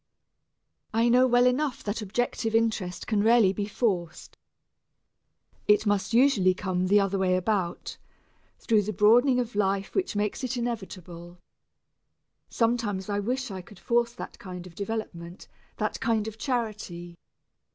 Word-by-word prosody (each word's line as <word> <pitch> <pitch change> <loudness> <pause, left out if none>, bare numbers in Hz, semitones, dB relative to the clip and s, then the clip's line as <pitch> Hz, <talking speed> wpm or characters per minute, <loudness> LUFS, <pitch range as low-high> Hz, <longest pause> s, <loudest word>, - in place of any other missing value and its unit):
I 230 +1 +3
know 250 +2 +5
well 245 0 +4
enough 255 +1 0
that 210 +2 -3
objective 225 +2 -2
interest 220 -6 0
can 215 -2 +1
rarely 220 -3 +5
be 205 +1 -3
forced 185 -7 -2 1.3
it 210 +1 +4
must 205 0 0
usually 230 -7 +4
come 185 -1 -1
the 205 +2 +5
other 195 -1 0
way 185 -1 +2
about 185 -2 -2 0.6
through 220 -3 +2
the 210 +1 -4
broadening 245 +6 +4
of 240 -1 -3
life 195 -1 0
which 380 - -1
makes 210 +5 -2
it 255 0 -2
inevitable. 185 -7 -6 1.1
Sometimes 225 -5 -1
I 205 0 0
wish 250 +3 -2
I 190 -1 -6
could 195 +2 -16
force 235 +6 0
that 240 - -9
kind 180 -2 -8
of 180 - -12
development, 190 -4 -6 0.3
that - - -2
kind 220 -2 0
of 220 0 -8
charity. 215 -9 -4
210 Hz, 140 wpm, -27 LUFS, 190-235 Hz, 1.3 s, know